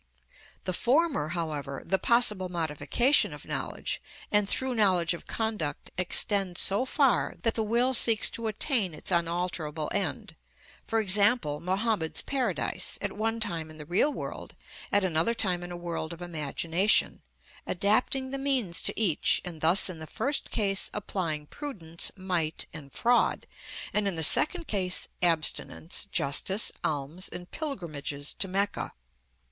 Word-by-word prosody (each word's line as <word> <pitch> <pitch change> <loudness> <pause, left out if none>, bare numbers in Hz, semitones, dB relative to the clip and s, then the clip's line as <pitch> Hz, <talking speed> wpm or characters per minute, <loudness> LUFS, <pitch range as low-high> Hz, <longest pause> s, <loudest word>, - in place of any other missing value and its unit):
The 185 - -3
former, 260 - +1
however, 155 -5 -4
the 190 - +1
possible 210 -6 +2
modification 175 - +1
of - - -10
knowledge, - - -4 0.3
and 205 -1 +2
through 260 -1 +2
knowledge 185 -7 +3
of 170 - -10
conduct, 210 -11 -3
extends 185 0 +2
so 200 +6 +2
far 270 -1 +1
that 230 - +2
the 225 - -2
will 235 +4 +1
seeks 230 -3 +7
to 230 -1 -4
attain 215 - +1
its 155 - -5
unalterable 170 -3 -2
end, 200 -1 -3 0.5
for 225 - +1
example, 200 -6 +3
Mohammed's 190 -2 -1
paradise, 270 -2 -1
at - - -3
one 225 +2 -2
time 170 -8 -2
in 155 - -12
the 150 - -9
real 180 - +2
world, - - -7 0.4
at 205 - +3
another 180 +6 +1
time 185 -6 0
in 175 0 -8
a 175 - -6
world 170 -1 -5
of 170 - -12
imagination, 165 +4 0 0.5
adapting 250 +7 +1
the 275 - -4
means 255 -11 +1
to - - +1
each, 190 -9 +2
and 165 -3 -7
thus 170 +4 +6
in 180 -4 -4
the 155 - -8
first 280 - -1
case 195 -3 0
applying 170 -7 -3
prudence, 170 - -2
might, 180 -4 -1
and 145 -3 -10
fraud, 240 - +1 0.5
and 210 -1 +1
in 195 - -2
the 160 - +1
second 335 - +5
case, 185 -6 0
abstinence, 165 +2 0
justice, 190 +6 +3
alms, 155 +5 -2
and 175 0 -8
pilgrimages 155 - -5
to 195 - 0
Mecca. 200 +2 -2
185 Hz, 145 wpm, -28 LUFS, 165-225 Hz, 0.5 s, seeks